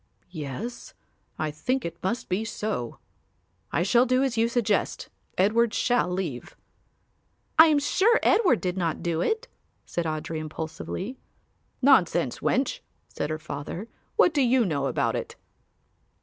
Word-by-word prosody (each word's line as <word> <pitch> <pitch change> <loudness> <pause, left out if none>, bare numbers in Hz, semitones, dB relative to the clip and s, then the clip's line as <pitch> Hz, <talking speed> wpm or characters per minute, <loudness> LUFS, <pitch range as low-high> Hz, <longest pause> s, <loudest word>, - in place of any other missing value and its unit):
"Yes, 165 - -6 0.4
I 155 -1 -1
think 250 - -1
it 170 - -6
must 230 +6 -2
be 185 +4 0
so; 210 - -3 0.7
I 170 - +1
shall 240 +6 +4
do 255 +2 +3
as 265 -4 0
you 225 0 +3
suggest. 230 -4 0 0.3
Edward 215 +4 +3
shall 245 -7 +2
leave." 180 -9 -4 1.0
"I 320 - +11
am 305 -2 +4
sure 390 +11 +3
Edward 360 - +4
did 180 0 -2
not 165 -4 -1
do 170 -1 0
it," 445 +3 0 0.4
said 170 - -3
Audry 155 0 -3
impulsively. 160 - -5 0.6
"Nonsense, 175 - +4
wench," - - 0 0.3
said 145 - -3
her 155 - -2
father, 155 +6 -6 0.3
"what 355 - +5
do 290 - +2
you 250 -1 +4
know 140 -6 0
about 130 - 0
it?" - - -5
190 Hz, 140 wpm, -26 LUFS, 160-245 Hz, 1.0 s, I